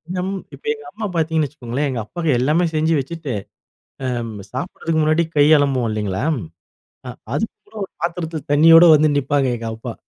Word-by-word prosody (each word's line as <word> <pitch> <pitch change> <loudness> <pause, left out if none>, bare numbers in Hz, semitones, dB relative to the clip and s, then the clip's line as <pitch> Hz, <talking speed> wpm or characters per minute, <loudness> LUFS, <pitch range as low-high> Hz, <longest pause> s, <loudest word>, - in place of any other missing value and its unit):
நம் 185 +1 -2 0.2
இப்ப - - -13
எங்க 445 - -12
அம்மா 215 0 -5
பார்த்தீங்கன்னு 160 -2 +1
வச்சுக்கோங்களேன். 140 0 -3
எங்க 125 -3 -3
அப்பாக்கு 165 +3 -2
எல்லாமே 155 +7 +2
செஞ்சு 160 +1 +2
வச்சுட்டு 150 -1 -5 0.7
அம் 120 -2 -3 0.2
சாப்பிடுறதுக்கு 160 +3 -2
முன்னாடி 155 +2 +2
கை 145 - +6
அலம்புவோம் 135 -4 +1
இல்லைங்களா? 105 -2 -2 0.9
அ - - -4 0.2
அதுக்கு 220 +10 -2
கூட 220 - -17
ஒரு - - -13
பாத்திரத்தில 165 -3 -3
தண்ணியோட 165 +3 +8
வந்து 155 0 +4
நிப்பாங்க 140 -1 +1
எங்க 115 0 -5
அம்மா. 115 - -7
150 Hz, 160 wpm, -20 LUFS, 130-165 Hz, 0.9 s, தண்ணியோட